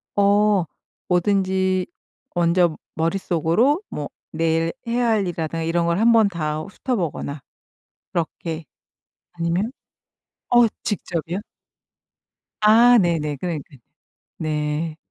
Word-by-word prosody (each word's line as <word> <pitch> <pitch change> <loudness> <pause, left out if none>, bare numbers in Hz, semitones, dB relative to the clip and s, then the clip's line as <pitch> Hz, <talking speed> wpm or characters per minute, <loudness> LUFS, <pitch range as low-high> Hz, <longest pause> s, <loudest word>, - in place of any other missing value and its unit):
어. 205 -2 +4 0.4
뭐든지 190 0 +1 0.5
먼저 170 -1 +3 0.2
머릿속으로 175 - +1
뭐 145 - -5 0.2
내일 165 +1 +1
뭐 230 - -3
해야 245 0 +2
할 220 -2 +3
일이라든가 165 -1 -3
이런 170 +1 +1
걸 170 +3 +1
한번 225 -1 +5
다 155 -4 -2
훑어 245 +7 -3
보거나 155 - -3 0.7
그렇게 165 -1 -3 0.7
아니면 170 +6 -1 0.8
어 240 -1 +6 0.2
직접이요? 180 -2 -3 1.2
아 235 +3 +7
네네 155 -5 0
그러니까 160 -5 -4 0.6
네. 155 +1 -2
175 Hz, 210 characters per minute, -22 LUFS, 160-205 Hz, 1.2 s, 아